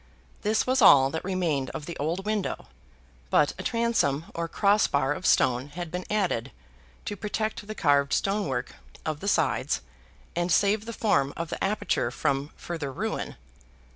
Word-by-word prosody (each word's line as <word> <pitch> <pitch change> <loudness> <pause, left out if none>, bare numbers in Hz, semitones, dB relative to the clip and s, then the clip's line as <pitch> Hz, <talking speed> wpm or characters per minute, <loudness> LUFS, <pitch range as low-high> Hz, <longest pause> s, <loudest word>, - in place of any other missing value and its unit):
This 215 +1 +1
was 260 0 +2
all 135 -9 +7
that 160 - -3
remained 170 -8 -1
of 150 - -5
the 170 - -6
old 165 +7 -2
window, 215 -2 -2 0.6
but 145 - +3
a - - -2
transom 230 - +1
or 170 0 -2
cross 205 +4 +3
bar 140 0 +1
of 185 - -3
stone 125 +2 +3
had 170 +2 -7
been 180 +1 -4
added 180 - 0 0.5
to 205 - -3
protect 210 +1 -3
the 215 - -5
carved 140 -4 +3
stone 200 -1 +1
work 125 -2 -3 0.3
of 155 -2 -2
the 200 - -5
sides, 160 -8 +1 0.5
and 175 +1 0
save 205 +1 +3
the 230 - -5
form 140 -12 +1
of 165 -1 -3
the - - -4
aperture 195 - 0
from 135 +3 -1
further 160 -5 -5
ruin. - - -3
170 Hz, 170 wpm, -27 LUFS, 140-205 Hz, 0.6 s, all